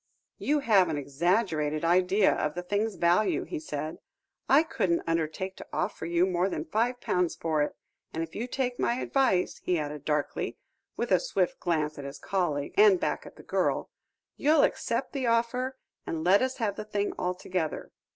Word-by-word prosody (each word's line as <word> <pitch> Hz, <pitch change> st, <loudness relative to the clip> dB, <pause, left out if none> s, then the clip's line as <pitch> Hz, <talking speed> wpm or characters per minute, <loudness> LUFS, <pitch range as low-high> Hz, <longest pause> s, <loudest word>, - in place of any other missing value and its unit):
"You 295 Hz, +1 st, +1 dB
have 200 Hz, -9 st, +4 dB
an 155 Hz, -, -1 dB
exaggerated 155 Hz, +1 st, 0 dB
idea 185 Hz, +4 st, +4 dB
of 150 Hz, -, -2 dB
the 180 Hz, -, -4 dB
thing's 205 Hz, +3 st, -1 dB
value," 175 Hz, +5 st, +2 dB
he -, -, -5 dB
said. 155 Hz, +1 st, -5 dB, 0.5 s
"I 285 Hz, +4 st, +6 dB
couldn't 180 Hz, -, 0 dB
undertake 165 Hz, +3 st, -2 dB
to -, -, -10 dB
offer 180 Hz, -4 st, -2 dB
you 170 Hz, +1 st, +3 dB
more 185 Hz, 0 st, +1 dB
than 155 Hz, -4 st, -3 dB
five 235 Hz, +8 st, 0 dB
pounds 180 Hz, -6 st, 0 dB
for 160 Hz, -2 st, 0 dB
it, 145 Hz, -, -1 dB, 0.4 s
and 165 Hz, -, -2 dB
if 160 Hz, -, -8 dB
you 235 Hz, +4 st, -3 dB
take 250 Hz, -1 st, -2 dB
my 235 Hz, -, +1 dB
advice," 255 Hz, -8 st, +1 dB
he 180 Hz, -, +1 dB
added 150 Hz, -2 st, -4 dB
darkly, 150 Hz, -1 st, -1 dB, 0.4 s
with -, -, -2 dB
a -, -, +6 dB
swift -, -, -1 dB
glance 155 Hz, -3 st, -1 dB
at 140 Hz, -, -6 dB
his 140 Hz, +1 st, -7 dB
colleague, 155 Hz, -7 st, -1 dB
and 405 Hz, -3 st, +7 dB
back -, -, -2 dB
at -, -, -13 dB
the -, -, -14 dB
girl, -, -, 0 dB, 0.5 s
"you'll 300 Hz, +1 st, +4 dB
accept 235 Hz, +3 st, 0 dB
the 265 Hz, -3 st, -1 dB
offer, 245 Hz, +3 st, 0 dB, 0.3 s
and 160 Hz, -1 st, -3 dB
let 190 Hz, +4 st, +5 dB
us 260 Hz, 0 st, -1 dB
have 210 Hz, -5 st, -1 dB
the -, -, -4 dB
thing 205 Hz, -1 st, -1 dB
altogether. 180 Hz, -2 st, -2 dB
180 Hz, 180 wpm, -28 LUFS, 160-230 Hz, 0.5 s, and